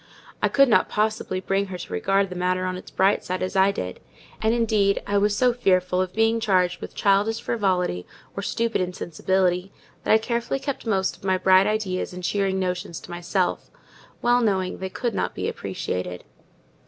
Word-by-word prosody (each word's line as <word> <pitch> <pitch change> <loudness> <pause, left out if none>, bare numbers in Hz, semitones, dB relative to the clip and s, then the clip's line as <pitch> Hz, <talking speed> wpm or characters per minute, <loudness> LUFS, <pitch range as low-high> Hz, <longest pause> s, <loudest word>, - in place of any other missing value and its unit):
I - - +4
could 275 0 +5
not 230 - +3
possibly 215 -3 -1
bring 195 +1 0
her 185 -1 -6
to 130 - -8
regard 195 - +1
the - - -5
matter 185 +1 0
on 185 0 -2
its 180 - -9
bright 195 +2 +2
side 185 +1 -3
as 185 - -3
I 190 +1 +5
did: 90 - -5 0.4
and 220 - +2
indeed 215 -4 +2
I 200 0 +1
was 205 0 +1
so 250 0 +3
fearful 185 -5 +2
of 185 -1 -2
being 225 +2 +2
charged 185 -5 +1
with - - -8
childish 205 +3 +2
frivolity, 180 - -1 0.3
or 200 - -3
stupid 230 +2 -1
insensibility, 180 +1 0 0.3
that - - 0
I 220 - +8
carefully 235 +3 -2
kept 275 -4 -5
most 190 -3 +1
of - - -25
my 190 -1 +2
bright 185 +1 +5
ideas 205 -4 -1
and 180 0 -8
cheering 195 +2 0
notions 180 -2 -3
to - - -11
myself; 175 +2 -1 0.5
well 245 +1 +4
knowing 190 -5 0
they 190 0 -4
could 235 +4 -2
not 90 - -2
be - - -2
appreciated. 90 -1 -4
190 Hz, 190 wpm, -24 LUFS, 185-215 Hz, 0.5 s, I